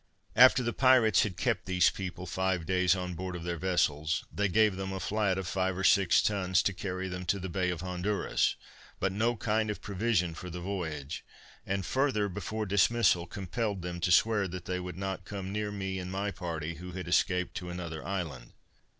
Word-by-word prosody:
After 125 0 +7
the 120 0 -1
pirates 125 -6 +5
had 95 -5 -2
kept - - 0
these 90 -2 +4
people 90 -1 -6
five 95 -1 -1
days 90 +1 +3
on 90 -1 -4
board 90 +1 -5
of 85 - -6
their 85 -1 -3
vessels, 80 -4 +1
they 100 0 +1
gave 105 +1 +3
them 95 0 -4
a 95 - -4
flat 105 -2 0
of 95 - -3
five 95 0 -1
or 95 - -2
six 95 -2 +5
tons 95 -4 +2
to 100 - +1
carry 95 +1 -4
them 90 0 -5
to 100 - +1
the 95 0 -5
Bay 90 +1 0
of 90 -2 -3
Honduras, 90 +3 0 0.4
but 95 - +1
no 115 +5 +1
kind 110 0 0
of 105 - -3
provision 100 -4 0
for 90 +2 -8
the 90 +1 -6
voyage; 80 -7 -4 0.4
and 95 -1 -1
further, 130 -6 +1
before 105 +3 -4
dismissal, 100 -2 +3
compelled 100 0 -3
them 90 0 -4
to 90 - 0
swear 105 +2 +4
that 90 0 -7
they 90 0 -2
would 90 -1 -6
not 95 -1 -3
come 95 -1 -6
near 105 0 -2
me 95 -2 -3
and 90 0 -5
my 100 +2 -2
party, 85 -3 -4
who 90 +1 -8
had 90 -3 -6
escaped 90 +1 +1
to 90 - -5
another 85 -3 -5
island. 80 -11 -5
95 Hz, 200 wpm, -30 LUFS, 90-100 Hz, 0.4 s, After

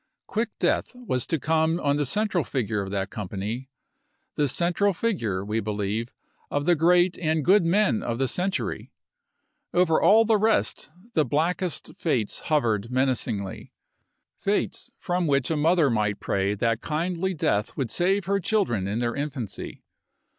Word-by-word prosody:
Quick 225 +1 -1
death - - 0
was 220 - -3
to 165 - 0
come 160 +3 +1
on 140 0 +1
the 145 -2 0
central 200 - +1
figure 115 -6 -2
of 95 - -5
that 95 0 -3
company 105 +5 -5 0.3
— - - -48
the 145 - +2
central 175 +7 +1
figure, 115 - -1
we 105 +2 -1
believe, 105 +2 -2 0.4
of 145 0 -1
the 175 - +5
great 175 +2 +3
and 155 -3 0
good 195 +1 +5
men 185 - +2
of 115 -1 -3
the 135 +1 +1
century. 185 +7 -2 0.8
Over 175 -3 +3
all 225 +2 +6
the 220 -1 +3
rest 220 +1 +1 0.2
the 155 - +3
blackest 170 +4 -1
fates 125 -11 0
hovered 115 -8 +1
menacingly 125 -6 -1 0.3
— - - -53
fates - - -1
from 175 -1 -1
which 140 0 +1
a - - +1
mother 155 -1 +3
might 105 -2 0
pray 100 0 0
that 115 +2 0
kindly 175 +4 -2
death 105 -8 0
would 130 -5 -2
save 190 +2 +1
her 200 +1 +1
children 175 - 0
in 105 +3 -2
their 120 0 -1
infancy. 140 -7 -5
145 Hz, 160 wpm, -25 LUFS, 115-180 Hz, 0.8 s, all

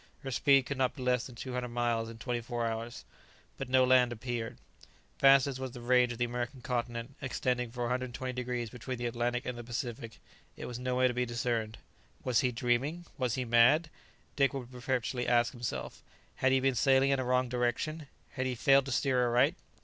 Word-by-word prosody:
Her 135 - -4
speed 135 +1 +4
could 140 0 -4
not 130 -1 +1
be 130 - -6
less 125 -1 +1
than 125 - -12
two 130 +2 -6
hundred 125 0 -2
miles 120 -1 -1
in 115 - -9
twenty 120 0 -3
four 120 0 -3
hours. 115 +1 -4 0.5
But - - -4
no 130 0 +5
land 125 -1 +5
appeared. 120 0 -4 0.6
Vast 135 -1 +7
as 135 -2 -4
was 130 -2 -5
the 125 - -8
range 125 0 +3
of 120 - -5
the 120 - +1
American 120 +2 -4
continent, 120 0 -3
extending 125 -2 -1
for 120 +1 -7
120 125 +1 -2
degrees 125 -2 -3
between 125 +1 -5
the 120 - -4
Atlantic 120 +1 -1
and 125 -1 -4
the - - -6
Pacific, 115 -1 -5 0.4
it - - -6
was 120 -1 -6
nowhere 130 0 +2
to 125 - -1
be 125 0 -1
discerned. 115 -2 -2 0.5
Was 125 -3 +2
he 125 - +1
dreaming? 125 +8 -1
was 125 -3 0
he 130 -1 -2
mad? 125 +8 +4 0.4
Dick 140 -1 +2
would 125 -2 -6
perpetually 125 -1 -2
ask 120 -1 +3
himself: 120 - -5 0.4
had 130 - +2
he 135 - +4
been 135 0 +2
sailing 135 +2 +4
in 135 - +2
a - - 0
wrong 125 0 +1
direction? 125 +6 -2 0.2
had 130 -2 -2
he 125 - -2
failed 135 +3 +4
to - - -4
steer 130 0 +2
aright? 120 +1 +3
125 Hz, 205 wpm, -31 LUFS, 120-130 Hz, 0.6 s, Vast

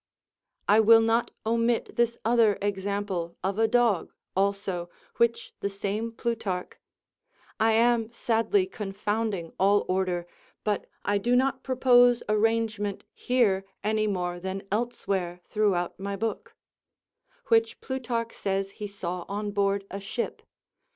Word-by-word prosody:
I 210 +2 +6
will 225 +1 +8
not 225 +1 +2 0.2
omit 230 +1 +1
this 235 0 +1
other 225 -3 +4
example 195 -3 -2
of 195 +2 -1
a 225 - +4
dog, 230 -7 +2 0.2
also, 195 -3 -1 0.3
which 235 0 +1
the 200 - -1
same 200 +3 -3
Plutarch 225 -6 -3 0.9
(I 220 0 +4
am 230 0 +3
sadly 235 - +1
confounding 205 - -3
all 200 +2 +4
order, 185 -2 0 0.4
but 210 -2 -1 0.2
I 205 0 +2
do 240 +5 +2
not 265 +1 +2
propose 245 -2 +4
arrangement 215 -1 0
here 225 -7 +2 0.2
any 215 0 +1
more 180 -3 -2
than 190 +2 -4
elsewhere 195 -6 -2
throughout 195 -5 0
my 200 +1 -3
book) 220 +2 -4 0.9
which 455 0 +3
Plutarch 240 -3 -3
says 195 0 -2
he 210 +1 -6
saw 180 -3 -5
on 205 +1 -3
board 200 -1 +1
a 195 - -4
ship. 200 +4 -4
210 Hz, 125 wpm, -27 LUFS, 195-230 Hz, 0.9 s, will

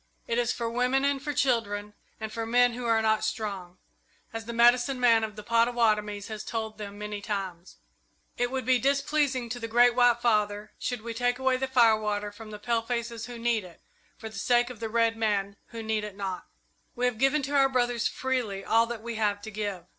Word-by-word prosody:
It 235 +1 0
is 240 -1 +1
for 235 - -3
women 250 +3 +1
and 280 -1 +1
for 295 - -3
children 210 -6 0 0.3
and 220 0 -5
for 230 - -3
men 245 +1 +3
who 240 0 -4
are 225 -1 +3
not 220 0 +2
strong, 195 -5 -4 0.6
as 225 0 -5
the 235 - -5
medicine 240 +2 +4
man 230 -2 +5
of 215 -2 -4
the 210 - -8
Pottawattomies 225 -3 +1
has 215 -1 -6
told 220 -2 -4
them 205 -1 -7
many 210 0 -5
times. 190 -4 -5 0.6
It 245 0 0
would 260 -1 -3
be 255 -1 +4
displeasing 275 -1 +1
to 245 +1 -4
the 230 - -4
Great 240 +2 +5
White 245 -1 +4
Father 210 -3 0
should 245 -3 -3
we 230 0 -5
take 245 +1 0
away 260 0 +2
the 265 +1 -2
firewater 215 -5 +2
from 215 +1 -11
the 210 - -7
palefaces 235 +1 -2
who 245 -1 -8
need 230 -2 0
it, 175 -2 -14 0.4
for 225 - -8
the 220 -2 -7
sake 240 +2 +2
of 235 - -11
the 225 -1 -4
red 230 0 +2
men 205 -3 0
who 230 -1 -7
need 220 -1 -1
it 210 -2 -7
not. 190 -2 -4 0.5
"We 245 0 0
have 245 -3 0
given 270 +3 +3
to 285 +2 -2
our 270 -1 +5
brothers 245 -2 +1
freely 245 -7 -2
all 230 +1 +3
that 230 -2 -6
we 235 -1 -5
have 205 -2 +1
to 220 - -7
give. 200 -4 -4
230 Hz, 215 wpm, -28 LUFS, 210-245 Hz, 0.6 s, man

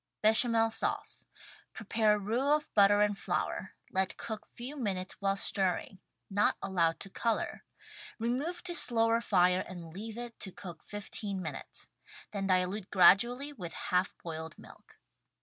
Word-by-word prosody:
Bechamel 225 +1 +5
Sauce. - - -3 0.5
Prepare 215 0 +2
roux 235 +8 +1
of 300 - -5
butter 205 0 +6
and 210 0 +3
flour, - - -3 0.2
let 190 -1 0
cook 215 -2 -5
few 255 +5 -8
minutes 195 -8 -3
while 195 0 +1
stirring 190 -1 0 0.2
— - - -53
not 205 +2 +2
allow 170 -4 +1
to 195 - -10
color 230 +2 -1 0.3
— - - -13
remove 280 +10 -2
to 360 -1 -4
slower 230 -6 +2
fire 180 -3 +3
and 170 -3 -9
leave 215 +4 -7
it 240 -1 -7
to 190 - -6
cook 175 -4 -10
15 205 -1 -4
minutes. 185 - -7 0.4
Then 195 -2 -2
dilute 185 +1 0
gradually 245 +9 +5
with 180 -10 -7
half 180 +1 -1
boiled 160 -1 -6
milk. - - -16
205 Hz, 150 wpm, -31 LUFS, 185-230 Hz, 0.5 s, butter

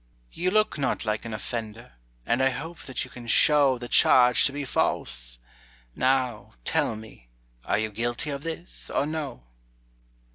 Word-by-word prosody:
"You 180 +2 -1
look 215 -5 +1
not 135 - -1
like 110 0 -2
an 115 - -5
offender, 110 - -6 0.3
And 120 +3 +1
I 135 - +4
hope 160 +6 -6
that 130 - -3
you - - -11
can 120 -1 -10
show 140 +1 +5
The 120 0 -7
charge 125 0 +5
to - - +1
be 145 0 -4
false. - - 0 0.6
Now, 130 -4 0
tell 115 - +1
me, 110 - -13 0.4
Are - - +1
you 110 0 -1
guilty 120 +6 -2
of 140 -1 -4
this, 165 +2 -3
or - - 0
no?" 150 - -5
125 Hz, 160 wpm, -26 LUFS, 110-145 Hz, 0.6 s, show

